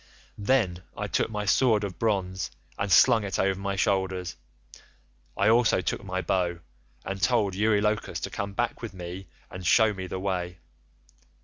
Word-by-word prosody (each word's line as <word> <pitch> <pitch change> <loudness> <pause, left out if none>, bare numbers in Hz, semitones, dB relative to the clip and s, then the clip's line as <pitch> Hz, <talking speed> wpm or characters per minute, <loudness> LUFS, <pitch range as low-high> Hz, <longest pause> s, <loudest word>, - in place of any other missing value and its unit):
"Then 100 -5 +1 0.2
I - - -2
took - - 0
my 105 -1 -3
sword 110 0 +3
of 95 -3 -5
bronze 95 -4 -1 0.3
and 100 -1 -3
slung 110 +2 +6
it 100 -2 -2
over 95 0 +1
my 100 0 -2
shoulders; 95 -2 0 1.0
I - - +3
also 115 -1 +4
took 90 - -2
my 95 -1 -3
bow, 90 -2 0 0.5
and 95 0 -4
told 110 -6 +2
Eurylochus 105 +1 +1
to - - -4
come 100 0 -4
back 120 +3 -2
with 115 -4 -7
me 90 +1 -7 0.2
and 90 - -7
shew 110 +5 +4
me 95 -1 -6
the 95 - -4
way. 90 -2 -3
100 Hz, 165 wpm, -27 LUFS, 95-105 Hz, 1.0 s, slung